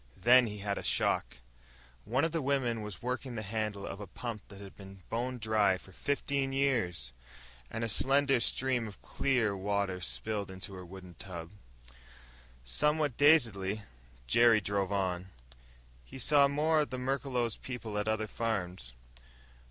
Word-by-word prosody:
Then 125 0 +6
he 105 -1 -5
had 100 -1 -1
a - - -7
shock. - - +1 0.7
One 130 +8 +2
of 165 - -1
the 165 0 -1
women 130 -5 0
was 105 0 -7
working 125 0 -3
the 110 - -3
handle 105 -1 -3
of 95 - -6
a 105 - -7
pump 115 +1 -6
that 100 - -12
had 100 -1 -11
been 95 -1 -12
bone 125 +2 -1
dry 110 -4 +2
for 95 - -16
fifteen 140 +5 -1
years 110 - 0 0.6
and 115 - -3
a - - 0
slender 135 +4 +3
stream 125 0 +1
of 100 - -11
clear 125 -7 +1
water 100 -1 -1
spilled 100 +2 -3
into 95 +1 -7
her 90 -1 -7
wooden 90 0 -11
tub! 85 -3 -7 1.1
Somewhat 150 - +1
dazedly, 110 -9 +4 0.4
Jerry 115 - +5
drove 100 -1 -1
on. 95 -2 -1 0.8
He - - -11
saw 140 +2 +5
more 155 +2 +2
of 150 - -2
the 130 - -4
Merklos 125 -3 -1
people 120 -4 -6
at 105 - -2
other 110 0 +1
farms. 90 - -3
110 Hz, 155 wpm, -32 LUFS, 95-130 Hz, 1.1 s, Then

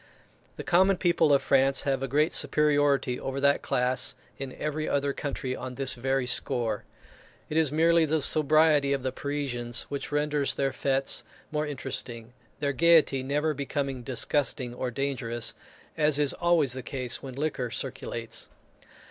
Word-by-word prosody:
The - - -7
common 190 +2 +4
people 170 -4 +3
of 140 -1 +4
France 135 0 +3
have 135 -2 0
a 135 - -1
great 150 +5 +2
superiority 145 -4 +2
over 135 +1 -4
that 140 0 +3
class 125 +1 0 0.2
in 135 -1 -5
every 150 +1 -3
other 140 0 0
country 135 -3 -4
on 130 -1 -7
this 135 0 +2
very 135 +1 -1
score. 120 -3 0 0.6
It 155 - -4
is 160 -3 +3
merely 165 +1 +4
the 155 +1 +1
sobriety 150 -1 +3
of 135 -2 -2
the 130 - -1
Parisians 130 -5 -3
which 145 +2 -5
renders 145 -1 0
their 135 -1 0
fêtes 135 0 +1 0.3
more 150 0 -1
interesting, 125 -4 -5 0.3
their 140 -1 0
gaiety 160 -3 +4
never 150 +4 0
becoming 140 -2 -3
disgusting 130 0 -1
or 125 +1 -3
dangerous, 120 -3 -2 0.4
as 150 -2 +2
is 145 -2 +2
always 170 -7 +2
the 130 - -5
case 125 0 -4
when 130 -2 -8
liquor 140 -4 -2
circulates. - - -5
140 Hz, 155 wpm, -27 LUFS, 130-150 Hz, 0.6 s, common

